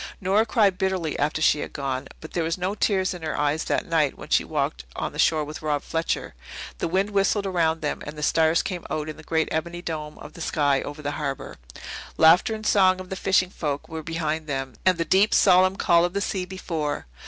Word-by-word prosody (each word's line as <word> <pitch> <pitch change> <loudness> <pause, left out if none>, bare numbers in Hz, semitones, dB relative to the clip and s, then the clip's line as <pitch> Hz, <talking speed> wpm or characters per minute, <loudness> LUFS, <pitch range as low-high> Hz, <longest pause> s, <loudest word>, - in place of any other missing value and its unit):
Nora 200 +4 +2
cried 200 -4 +2
bitterly 190 -5 0
after 150 +2 0
she 150 - +4
had - - -5
gone. 135 -1 -3
But 155 - -9
there 175 - 0
were 160 - -1
no 185 +2 -1
tears 190 -3 +1
in 180 - -8
her 155 -1 -3
eyes 150 +2 0
that - - 0
night 155 -4 +1
when - - -10
she - - +3
walked - - -2
on - - -3
the - - -9
shore 155 -2 +3
with 150 +1 -8
Rob 150 -2 -1
Fletcher. 165 0 -2 0.5
The - - 0
wind 190 +4 0
whistled 200 0 +1
around 165 -4 +1
them, 150 - -2
and 150 +1 -7
the 150 - -5
stars 160 +2 +3
came 180 -3 -4
out 155 0 -3
in 155 - -7
the - - -11
great 160 0 0
ebony 170 +2 -3
dome 150 -3 -5
of - - -11
the 170 - -10
sky 145 -3 +1
over 145 +1 -7
the 145 - -1
harbour. 140 -2 -4 0.6
Laughter 175 +8 +5
and 215 0 -8
song 185 -3 +4
of 185 0 -9
the - - -2
fishing 185 -1 +2
folk 145 -5 -3
were 160 -1 -6
behind 160 -1 -3
them, 135 -2 -3
and 185 -2 +5
the 165 - -1
deep, 200 +3 +4
solemn 185 0 +5
call 170 -3 +3
of 175 0 0
the 200 - 0
sea 190 -2 -2
before. 165 -5 -4
165 Hz, 230 wpm, -25 LUFS, 150-185 Hz, 0.6 s, Laughter